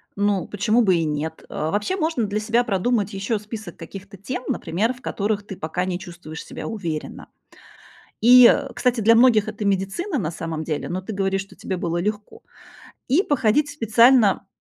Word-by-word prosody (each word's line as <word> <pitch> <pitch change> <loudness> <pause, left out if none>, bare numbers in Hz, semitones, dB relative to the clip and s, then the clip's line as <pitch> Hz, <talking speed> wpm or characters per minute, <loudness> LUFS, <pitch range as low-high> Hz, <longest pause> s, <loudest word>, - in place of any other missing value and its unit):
Ну, 200 -2 0
почему 215 +4 +1
бы 190 -5 +3
и 165 - +1
нет? 155 +2 -4
Э, 155 +1 -3
вообще, 210 - -1 0.2
для 210 -2 0
себя 230 +3 +1
продумать 210 0 0
ещё 200 +3 -1
список 210 -4 -9
каких-то 195 +4 -10
тем, 250 +6 -5
например, 200 +10 -1
в 255 - -18
которых 205 -2 -2
ты 195 - -7
пока 175 +3 -3
не 180 -1 -3
чувствуешь 170 -3 -9
себя - - -8
уверенно. 170 -9 -5 0.9
И, 245 +1 +8
э, 280 -1 0
кстати, 245 -2 0
для 230 +2 +5
многих 230 -3 +5
это 215 0 -5
медицина 200 - -1
на 165 -6 -2
самом 160 -1 -5
деле, 155 -2 -3
но 185 +2 -3
ты 205 +4 -7
говоришь, 195 0 -1
что 195 - -16
тебе 190 - -4
было 170 -1 -2
легко. 210 +3 -4 0.7
И 305 +10 +3
походить 290 +1 +1
специально. 230 -5 +4
205 Hz, 175 wpm, -22 LUFS, 180-230 Hz, 0.9 s, И